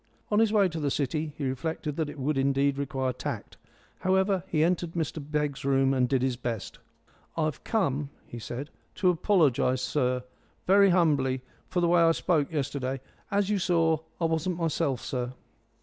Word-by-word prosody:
On 210 - +4
his 225 -2 +4
way 205 -3 +4
to 165 -2 -5
the 145 -2 0
City 150 +3 -1
he 145 - -3
reflected 150 +3 -3
that 155 -2 -1
it 150 - -9
would 145 +2 0
indeed 140 +1 +2
require 135 -2 -1
tact. - - -6 0.4
However, 190 0 +2
he 155 -4 +2
entered 170 0 0
Mr 160 -1 -2
Begg's 150 -1 -2
room 135 0 +3
and 125 -2 +2
did 135 -2 +2
his 130 -2 +1
best. 120 -4 -4 0.6
"I've 155 -2 -1
come," 150 - 0 0.2
he 120 - -8
said, 125 +7 -6 0.2
"to 185 -1 +3
apologise, 155 - +2
sir, 125 -3 0 0.4
very 200 +1 +6
humbly 140 -8 +2 0.3
for 180 - 0
the 170 - +3
way 175 0 +4
I 165 0 +5
spoke 160 -4 +1
yesterday. 135 -3 -2 0.3
As 200 0 +1
you 205 - +2
saw, 165 -3 +2 0.2
I 170 - +1
wasn't 165 +2 0
myself, 160 -6 0
sir." 125 -1 -3
150 Hz, 175 wpm, -28 LUFS, 135-170 Hz, 0.6 s, very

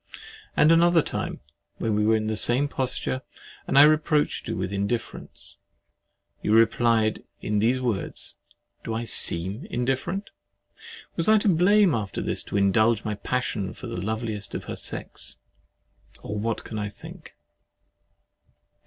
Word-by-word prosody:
And 150 +2 +6
another 170 -1 +5
time, - - -4 0.4
when 110 -2 -1
you 105 - +2
were 110 - +4
in 110 0 -1
the 110 0 -1
same 120 +6 +2
posture, 130 -1 -2 0.5
and 135 - +1
I 140 - +10
reproached 155 -1 +2
you 115 -1 -3
with 95 +1 -3
indifference, 100 +4 -4 0.8
you 105 - 0
replied 115 -1 +3 0.2
in 105 0 -1
these 120 +5 +2
words, 120 -6 0 0.5
"Do 110 - -3
I 115 - -2
SEEM 100 - 0
INDIFFERENT?" 135 - -2 0.9
Was 165 +4 +2
I 220 - +7
to 210 - 0
blame 190 +1 +4
after 105 -4 -3
this - - 0
to - - -3
indulge 110 +3 +3
my 105 - -1
passion 105 -3 -2
for - - -10
the 115 -7 -5
loveliest 110 0 -4
of - - -4
her - - -6
sex? - - -8 0.9
Or 105 - -5
what 110 +2 -2
can 110 - -6
I 105 0 -3
think? - - -13
115 Hz, 145 wpm, -25 LUFS, 105-140 Hz, 0.9 s, I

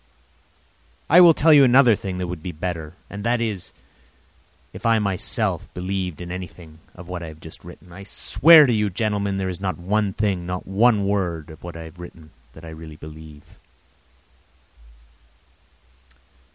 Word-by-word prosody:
I 175 +3 +8
will 170 -3 +7
tell 160 +1 +5
you 145 -2 +7
another 125 -2 +5
thing 95 -2 -6
that 90 - -3
would 90 -2 -6
be 90 - -5
better, 80 -1 -6
and 100 0 -8
that 120 +1 +1
is, 110 -6 -4 1.0
if - - -11
I 115 -1 +3
myself 100 -4 -1
believed 90 -2 -4
in 90 0 -7
anything 90 -3 -9 0.2
of 90 -1 -12
what 90 -1 -6
I 85 - -7
have 80 0 -11
just 80 0 -11
written. 90 +1 -14
I 95 - -10
swear 155 +9 +5
to 125 - +1
you, 105 -2 +1
gentlemen, 100 -1 -2
there 95 -1 -2
is 95 0 -5
not 95 -2 -2
one 100 +3 -1
thing, 95 -5 -2
not 90 0 -5
one 105 +1 +2
word 85 -6 -2
of 80 - -14
what 85 -1 -8
I 80 - -8
have 80 +2 -13
written 85 -3 -12 0.2
that 80 - -13
I - - -9
really 80 -1 -10
believe. 75 -1 -12
90 Hz, 170 wpm, -22 LUFS, 85-105 Hz, 1.0 s, I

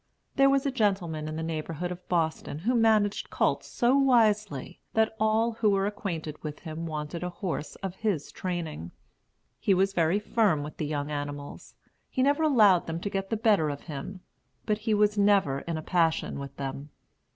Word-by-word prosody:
There 275 0 +5
was 275 0 +2
a 275 - +1
gentleman 190 -10 0
in 155 - -4
the 160 - -3
neighborhood 165 +2 -3
of 180 0 -9
Boston 160 -4 -1
who 215 +11 0
managed 220 -3 +2
colts - - 0
so 245 +1 +2
wisely, 215 - +2 0.2
that 220 0 +2
all 220 +2 +2
who 225 -1 +1
were 195 -1 +2
acquainted 170 -7 -4
with 150 -1 -6
him 165 0 -5
wanted 155 +1 -4
a 180 - -2
horse 175 -4 -4
of 190 -1 -4
his 205 -10 -1
training. 165 - -4 0.7
He 195 - +3
was 195 +1 +2
very 170 +1 +2
firm 210 -7 +1
with 150 - -8
the 150 - -2
young 145 0 -3
animals; 145 -1 -6 0.3
he 260 - 0
never 285 +3 +3
allowed 215 - +5
them 165 0 -3
to 200 +3 -4
get 195 -1 -2
the 225 - 0
better 210 -8 +3
of 140 -1 -5
him; 155 +4 -7 0.4
but 210 0 0
he 215 0 +1
was 210 0 +2
never 200 -9 +3
in 165 +2 -4
a 155 - -5
passion 165 -5 +1
with 140 0 -8
them. 140 +1 -5
185 Hz, 185 wpm, -28 LUFS, 155-215 Hz, 0.7 s, There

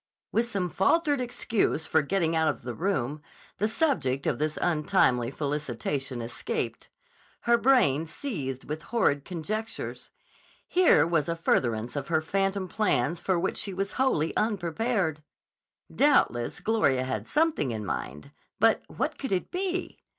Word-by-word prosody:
With 235 +1 +1
some 190 -6 -2
faltered 290 - +2
excuse 230 -9 0
for 160 - +3
getting 165 +1 0
out 160 0 +2
of 150 - -1
the 125 - -4
room, 150 - -1 0.4
the 210 - +2
subject 160 - 0
of - - 0
this 155 0 -1
untimely 150 -7 +2
felicitation 135 -3 -3
escaped. 115 +1 -4 0.5
Her 235 - +4
brain 230 - +3
seethed 145 - -5
with 155 +1 -4
horrid 165 -9 +1
conjectures. 210 +6 -4 0.6
Here 355 - +5
was 165 -2 +1
a 165 - 0
furtherance 120 -7 0
of 140 -2 -3
her 160 -2 +2
phantom 195 +2 0
plans 175 - +1
for 190 0 0
which 190 - -1
she 195 -3 -3
was 195 +1 -2
wholly 210 - +1
unprepared. 195 -4 0 0.7
Doubtless 120 - +2
Gloria 140 - +2
had 130 0 -3
something 310 - +1
in 110 -3 -4
mind; 75 - -5 0.3
but - - +4
what - - -3
could 270 - -4
it 185 -2 -1
be? 365 0 -3
165 Hz, 145 wpm, -27 LUFS, 140-220 Hz, 0.7 s, Here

